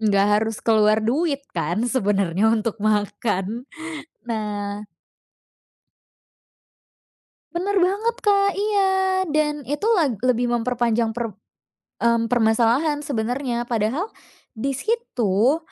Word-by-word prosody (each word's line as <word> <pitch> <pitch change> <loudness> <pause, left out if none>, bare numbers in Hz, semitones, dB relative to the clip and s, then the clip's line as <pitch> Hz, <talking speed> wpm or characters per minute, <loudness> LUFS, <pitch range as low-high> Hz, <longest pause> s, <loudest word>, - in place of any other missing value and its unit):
Nggak 200 -2 +3
harus 220 -1 -2
keluar 215 -1 +4
duit 280 +3 0
kan, 175 +9 -1
sebenernya, 200 -4 +1
untuk 225 -1 -1
makan? 210 +1 -1 0.6
Nah 210 -2 -4 2.7
Bener 390 +3 -1
banget, 405 +6 +1
Kak. 400 -1 +4
Iya, 405 -2 +2 0.4
dan 300 -1 0
itu 295 +8 -2
lag 300 - +2
lebih 245 -1 +2
memperpanjang 235 -1 0
per 230 -2 -4 0.7
mmm, 235 -1 +3
permasalahan, 240 +6 +2
sebenarnya. 245 -1 -2
Padahal, 240 - -1 0.4
di 270 +4 -2
situ, 265 - +1
235 Hz, 95 wpm, -22 LUFS, 215-295 Hz, 2.7 s, keluar